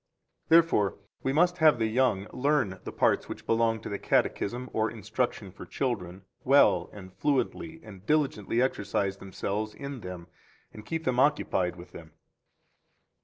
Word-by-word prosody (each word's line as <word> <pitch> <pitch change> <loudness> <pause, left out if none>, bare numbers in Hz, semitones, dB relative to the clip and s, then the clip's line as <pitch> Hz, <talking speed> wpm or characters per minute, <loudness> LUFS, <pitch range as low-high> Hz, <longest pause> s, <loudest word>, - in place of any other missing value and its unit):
3 160 - +5
Therefore 165 -12 +3 0.2
we 135 - 0
must 175 +5 +2
have 155 -5 +6
the 115 - +1
young 110 -3 +1
learn 130 -9 +1
the - - -5
parts - - +1
which - - -7
belong 115 0 +2
to - - -7
the 100 - -4
Catechism 125 +4 0
or 110 0 +1
instruction 110 -2 -3
for 100 - -11
children 95 -8 -3 0.2
well 140 +2 +4
and 95 -3 -11
fluently 150 - -1
and 95 -4 -12
diligently 130 -6 +1
exercise 100 -5 -1
themselves 100 +3 -4
in 140 -2 -6
them 90 -2 -7 0.5
and 105 0 -11
keep 165 0 -3
them 125 -3 0
occupied 95 -10 +2
with 90 0 -12
them. 80 -2 -12
115 Hz, 155 wpm, -28 LUFS, 100-135 Hz, 0.5 s, have